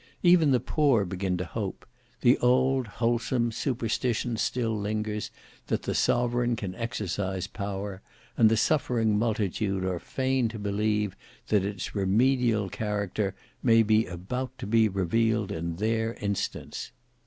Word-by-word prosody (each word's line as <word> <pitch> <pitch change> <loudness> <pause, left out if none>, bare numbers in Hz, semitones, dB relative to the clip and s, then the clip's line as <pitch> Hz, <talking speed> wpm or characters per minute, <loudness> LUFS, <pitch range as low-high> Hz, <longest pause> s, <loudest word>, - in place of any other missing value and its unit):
Even 175 -4 +6
the 130 -2 +4
poor 135 -5 +2
begin 95 0 -2
to 90 - -3
hope; 100 +2 -5 0.4
the 125 0 +6
old, 130 0 +3
wholesome 115 +2 0
superstition 120 0 -1
still 115 0 0
lingers, 105 0 -2 0.4
that - - -1
the - - -2
sovereign 120 0 +2
can 100 -5 -5
exercise 95 -4 -3
power; 100 -1 -5 0.3
and 110 - +6
the 110 - +2
suffering 115 -6 +2
multitude 105 -3 0
are 90 -2 -1
fain 130 +1 0
to 110 - -7
believe 105 0 0 0.3
that 105 -3 +3
its 100 -1 -4
remedial 110 +2 +2
character 100 -1 -2 0.3
may 115 -2 +5
be 110 +1 +3
about 125 +9 -5
to - - -6
be 110 +1 +3
revealed 105 +3 +1
in 85 -2 -3
their 115 +4 0
instance. 100 -1 -3
110 Hz, 135 wpm, -27 LUFS, 100-120 Hz, 0.4 s, Even